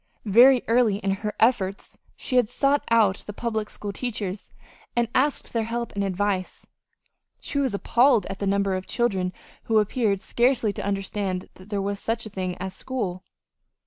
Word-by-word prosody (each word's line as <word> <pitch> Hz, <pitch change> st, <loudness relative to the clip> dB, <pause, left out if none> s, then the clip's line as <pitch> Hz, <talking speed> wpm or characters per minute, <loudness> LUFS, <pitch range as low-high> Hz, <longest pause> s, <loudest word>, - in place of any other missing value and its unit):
Very 245 Hz, +5 st, +6 dB
early 230 Hz, -3 st, +3 dB
in 195 Hz, -1 st, -1 dB
her 210 Hz, +2 st, -3 dB
efforts 205 Hz, -5 st, +1 dB, 0.2 s
she 255 Hz, -, -1 dB
had 240 Hz, -4 st, +3 dB
sought 275 Hz, +3 st, +2 dB
out 215 Hz, -4 st, +4 dB
the 210 Hz, -, -5 dB
public 220 Hz, -1 st, -3 dB
school 205 Hz, -1 st, -6 dB
teachers, 210 Hz, -5 st, -4 dB, 0.4 s
and 240 Hz, -1 st, +2 dB
asked 285 Hz, +2 st, +1 dB
their 230 Hz, -2 st, 0 dB
help 235 Hz, +1 st, -3 dB
and 200 Hz, -, -1 dB
advice. 195 Hz, -1 st, -2 dB, 0.7 s
She 280 Hz, -, -3 dB
was 265 Hz, -7 st, 0 dB
appalled 235 Hz, 0 st, +3 dB
at 195 Hz, -, -6 dB
the 200 Hz, -, -1 dB
number 200 Hz, 0 st, +1 dB
of 185 Hz, 0 st, -5 dB
children 195 Hz, -7 st, 0 dB, 0.3 s
who 225 Hz, -, +2 dB
appeared 210 Hz, -1 st, +1 dB
scarcely 240 Hz, -1 st, +1 dB
to -, -, -5 dB
understand 195 Hz, -1 st, -2 dB
that 185 Hz, +2 st, -16 dB
there 200 Hz, -2 st, -1 dB
was 200 Hz, 0 st, -2 dB
such 225 Hz, +1 st, -2 dB
a 215 Hz, -, -8 dB
thing 185 Hz, -2 st, -3 dB
as 190 Hz, 0 st, -5 dB
school. 190 Hz, -8 st, -4 dB
210 Hz, 175 wpm, -25 LUFS, 195-235 Hz, 0.7 s, Very